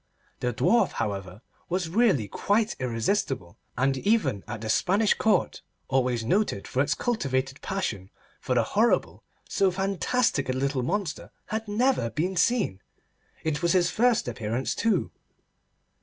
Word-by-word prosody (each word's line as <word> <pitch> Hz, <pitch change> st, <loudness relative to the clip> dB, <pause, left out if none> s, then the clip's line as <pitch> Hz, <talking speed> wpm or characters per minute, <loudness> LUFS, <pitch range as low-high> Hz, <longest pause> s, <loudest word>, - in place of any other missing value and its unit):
The 125 Hz, -, 0 dB
Dwarf, 235 Hz, -, +2 dB
however, 100 Hz, -2 st, -4 dB, 0.3 s
was 180 Hz, -1 st, -1 dB
really 185 Hz, -, +2 dB
quite 210 Hz, -, 0 dB
irresistible, 120 Hz, -, -1 dB, 0.2 s
and 135 Hz, +2 st, +2 dB
even 205 Hz, -, +1 dB
at 110 Hz, -1 st, -6 dB
the 110 Hz, -, -5 dB
Spanish 195 Hz, -, +3 dB
Court, 220 Hz, -, +1 dB, 0.3 s
always 125 Hz, -3 st, +1 dB
noted 190 Hz, -, 0 dB
for 130 Hz, -, 0 dB
its 140 Hz, -, +1 dB
cultivated 135 Hz, -, -1 dB
passion 110 Hz, -, -3 dB, 0.3 s
for 125 Hz, -, -1 dB
the 120 Hz, -, +4 dB
horrible, 220 Hz, -, +1 dB, 0.2 s
so 195 Hz, -, +2 dB
fantastic 195 Hz, -, 0 dB
a -, -, +1 dB
little 135 Hz, 0 st, 0 dB
monster 180 Hz, +4 st, -2 dB, 0.2 s
had 220 Hz, 0 st, -4 dB
never 210 Hz, -, +1 dB
been 180 Hz, +9 st, -2 dB
seen. 185 Hz, -, +1 dB, 0.6 s
It 155 Hz, -2 st, -1 dB
was 170 Hz, 0 st, +2 dB
his 175 Hz, -2 st, +3 dB
first 240 Hz, -, +2 dB
appearance, 115 Hz, +2 st, -2 dB
too. 230 Hz, -1 st, 0 dB
150 Hz, 140 wpm, -26 LUFS, -, 0.6 s, the